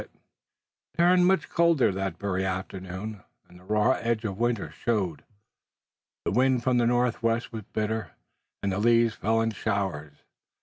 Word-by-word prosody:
It - - -12 0.9
turned 180 +1 +5
much 190 0 +2
colder 170 -9 +3
that 95 0 -3
very 95 -2 -2
afternoon, 95 +2 -5 0.3
and 90 - -16
the - - -18
raw 105 +5 +2
edge 115 -3 -1
of 100 -1 -4
winter 120 -3 0
showed. 95 -10 -2 1.0
The - - 0
wind 125 +2 +2
from 125 -1 +2
the 120 - +3
northwest 120 -1 0
was 110 -3 -6
bitter 110 +1 -2 0.5
and 100 - 0
the 95 - -2
dead 105 - 0
leaves 115 -1 +4
fell 110 +2 0
in 115 0 0
showers. 95 -9 -3
110 Hz, 160 wpm, -27 LUFS, 95-120 Hz, 1.0 s, turned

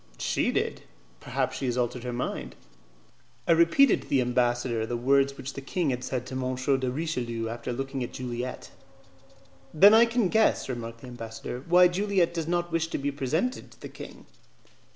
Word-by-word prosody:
"She - - 0
did." - - -2 0.4
"Perhaps - - -2
she 135 - -3
has 120 0 -1
altered 125 0 -1
her 125 - -2
mind." 120 +1 -4 0.9
I - - +4
repeated 170 - +5
to 140 - -14
the 140 - +2
ambassador 120 -1 +1
the 120 +2 -3
words 140 +2 +2
which 135 - -6
the 135 - -7
king 165 +1 -1
had 125 0 -3
said 125 -1 -3
to 130 - -8
M. 130 0 -2
de 130 0 0
Richelieu 125 -7 -3
after 115 +1 -5
looking 135 +1 -3
at 120 - -7
Juliette. 125 0 -5 1.0
"Then 200 +7 +7
I 225 +1 +8
can 230 -4 +1
guess," 220 +3 +2
remarked 115 -2 -6
the 130 - -10
ambassador, 120 +1 -7
"why 180 +1 +7
Juliette 185 -1 +1
does 165 -2 -3
not 175 0 -1
wish 165 0 0
to - - -3
be 145 +1 -2
presented 150 - -2
to - - -23
the - - -8
king." - - -11
130 Hz, 185 wpm, -27 LUFS, 125-165 Hz, 1.0 s, I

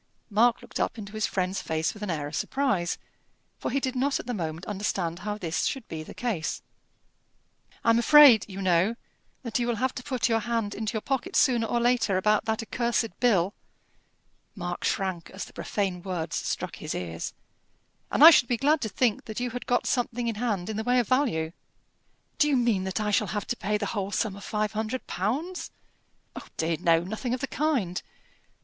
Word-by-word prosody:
Mark 230 +3 +3
looked - - -7
up - - -1
into 205 -2 -7
his 215 -1 0
friend's 185 0 -1
face 160 0 -1
with 210 - -13
an 210 - -3
air 155 -4 -2
of 145 +2 -6
surprise, 255 - 0 0.6
for - - -2
he 275 - +1
did 260 -1 -2
not 275 +2 +1
at - - -7
the 245 - -3
moment 165 -3 -4
understand 190 -4 -2
how 210 +1 -3
this 165 -5 -1
should 265 -4 -2
be 160 -1 -5
the 155 - -10
case. 220 -10 -2 1.2
"I 230 - +5
am 230 - +4
afraid, 275 -4 +8
you 195 0 -5
know, 185 +5 +3 0.5
that 235 -2 -1
you 240 - 0
will 240 - +1
have 255 +3 0
to - - -6
put 255 -1 0
your 225 -1 +2
hand 230 -3 -1
into 215 0 -3
your 220 - -3
pocket 270 -3 -2
sooner 240 -4 +3
or 240 - +1
later 240 -5 +2
about 210 +2 +2
that 220 0 -1
accursed 235 -4 -1
bill 200 -6 +3 0.5
" - - -43
Mark 175 0 -4
shrank 185 -4 -1
as 190 - -6
the - - -16
profane 190 -4 -2
word 170 -4 -4
struck - - -3
his - - -5
ears 85 -2 -5 0.8
"and - - +4
I 325 - +13
should 245 - +5
be 240 - +2
glad 290 +4 +2
to 220 - -2
think 230 +1 +1
that 220 0 -5
you 245 0 -2
had 245 +1 -6
got 245 - +1
something 245 -1 -1
in 230 - 0
hand 205 -7 -1
in 215 - -3
the 220 - -1
way 245 +2 +2
of 240 -4 +2
value." 235 - +1 0.9
"Do 300 - +5
you 285 -3 +3
mean 230 -6 +1
that 190 +3 -2
I 210 -1 0
shall 200 - +2
have 210 -1 -3
to 245 - -2
pay 210 -2 -1
the 205 - -3
whole 200 -3 -2
sum 205 0 -1
of 200 - -10
£500?" 220 - -2 0.7
"Oh! - - -8
dear, 160 0 0
no; 165 -2 +4
nothing 220 +6 -2
of - - -7
the - - 0
kind. 260 - 0
215 Hz, 205 wpm, -27 LUFS, 190-245 Hz, 1.2 s, I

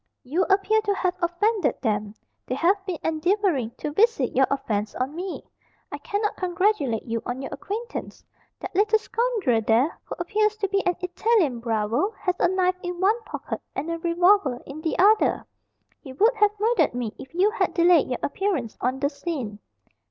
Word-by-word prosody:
You 300 +9 -1
appear 400 +3 +3
to 410 -2 0
have 365 -2 0
offended 350 - +1
them. 210 -3 -2 0.3
They 255 - -2
have 375 +7 +2
been 360 -3 -2
endeavouring 325 - +1
to 300 - -4
visit 400 - +2
your 265 +1 +4
offence 215 -6 -2
on 260 +3 -2
me. 365 +2 -5 0.5
I - - -5
cannot 420 0 -2
congratulate 360 - 0
you 230 -1 -2
on 245 +1 -4
your 270 - -6
acquaintance. 465 +4 -6 0.3
That - - -7
little 425 +3 +3
scoundrel 435 - 0
there, 230 +8 +2
who - - -6
appears 425 +4 0
to 400 -2 -1
be 395 0 +1
an 355 - +2
Italian 360 - +1
bravo, 230 - -1
has 365 - 0
a - - +4
knife 365 0 +1
in 355 0 -5
one 420 +5 +2
pocket, - - -6
and 310 +5 -3
a 335 - -3
revolver 340 -5 +3
in 285 +3 -8
the 320 - -2
other. 420 +4 +4 0.5
He 265 -4 -10
would 435 - +4
have 420 -2 +2
murdered 425 - +2
me 240 -3 -3
if 265 - -10
you 390 +4 +3
had 455 - -1
delayed 345 -2 +5
your 250 - -1
appearance 320 - -1
on 255 +2 0
the 285 - +2
scene." 280 -8 -5
350 Hz, 180 wpm, -24 LUFS, 265-410 Hz, 0.5 s, delayed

